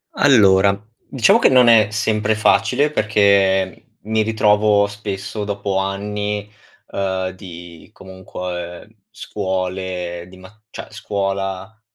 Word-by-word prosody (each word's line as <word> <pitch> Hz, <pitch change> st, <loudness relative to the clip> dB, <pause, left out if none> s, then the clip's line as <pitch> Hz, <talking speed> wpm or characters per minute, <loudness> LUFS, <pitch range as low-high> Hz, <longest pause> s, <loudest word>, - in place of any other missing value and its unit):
Allora, 100 Hz, -7 st, +4 dB, 0.3 s
diciamo 120 Hz, -5 st, +3 dB
che -, -, +4 dB
non 125 Hz, -2 st, +5 dB
è 110 Hz, -3 st, +5 dB
sempre 110 Hz, 0 st, 0 dB
facile 120 Hz, +7 st, +2 dB
perché 100 Hz, -, +1 dB
mi 110 Hz, +1 st, 0 dB
ritrovo 105 Hz, -1 st, +2 dB
spesso, 105 Hz, 0 st, -6 dB
dopo 100 Hz, -1 st, -3 dB
anni, 105 Hz, +1 st, -3 dB, 0.4 s
ehm, 95 Hz, -1 st, -2 dB
di 85 Hz, -3 st, -12 dB
comunque 90 Hz, -1 st, -8 dB, 0.2 s
scuole 95 Hz, -3 st, -4 dB
di 95 Hz, -, -15 dB
ma 95 Hz, +4 st, -17 dB
cioè -, -, -9 dB
scuola, 95 Hz, +1 st, -4 dB
100 Hz, 105 wpm, -19 LUFS, 95-105 Hz, 0.4 s, non